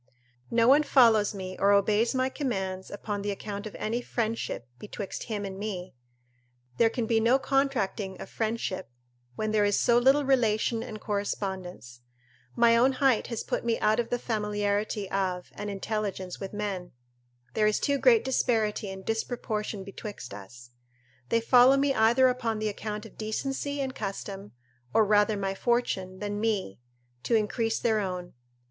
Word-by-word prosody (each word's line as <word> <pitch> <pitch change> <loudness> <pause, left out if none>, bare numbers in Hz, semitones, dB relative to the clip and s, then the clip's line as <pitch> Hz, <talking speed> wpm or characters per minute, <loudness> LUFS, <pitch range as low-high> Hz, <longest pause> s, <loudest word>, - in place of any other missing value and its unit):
No 230 0 +3
one 280 +4 +7
follows 225 -8 +4
me 185 -1 -6
or 200 +1 +4
obeys 210 +4 +3
my 260 0 +2
commands 190 -9 -3
upon 205 0 -4
the 205 - -3
account 205 +1 -5
of 210 - -10
any 230 +3 -2
friendship, 225 - -3
betwixt 205 -1 -6
him 210 -3 -3
and 190 0 -6
me; 190 -4 -5 0.8
there 230 - +5
can 230 0 -2
be 225 0 +2
no 235 +4 +4
contracting 250 -9 -1
of - - -7
friendship 220 - -3 0.5
where 215 - -2
there 215 -1 +2
is 205 0 +2
so 240 -1 +4
little 270 +3 +4
relation 230 -3 +2
and 215 -2 -7
correspondence: 190 - -4 0.5
my 235 -1 +5
own 255 +3 +4
height 260 -3 +2
has 230 -2 -4
put - - -2
me 235 -1 0
out 215 +2 +2
of 235 - -1
the 245 - 0
familiarity 210 -2 -1
of 185 -2 -2
and 205 - -5
intelligence 195 -2 -3
with 195 -1 -6
men; 200 -4 -4 0.6
there 215 -1 +3
is 215 - +2
too 280 -1 +1
great 465 - +5
disparity 220 -5 0
and 190 0 -8
disproportion 220 -3 -3
betwixt 195 - -8
us. 120 +5 -11 0.6
They 230 - +2
follow 250 +3 +6
me 275 0 +2
either 240 +3 +5
upon 235 -3 -1
the 215 0 -1
account 210 0 -5
of - - -14
decency 270 +6 -3
and 265 -1 -2
custom; 200 -2 -6 0.4
or 220 - +6
rather 210 0 +3
my 195 -1 -1
fortune, 195 -5 -1
than 205 +1 -4
me, 205 - -1 0.4
to 230 - +1
increase 225 +1 0
their 220 -2 +1
own. 180 -3 -4
215 Hz, 165 wpm, -28 LUFS, 200-235 Hz, 0.8 s, one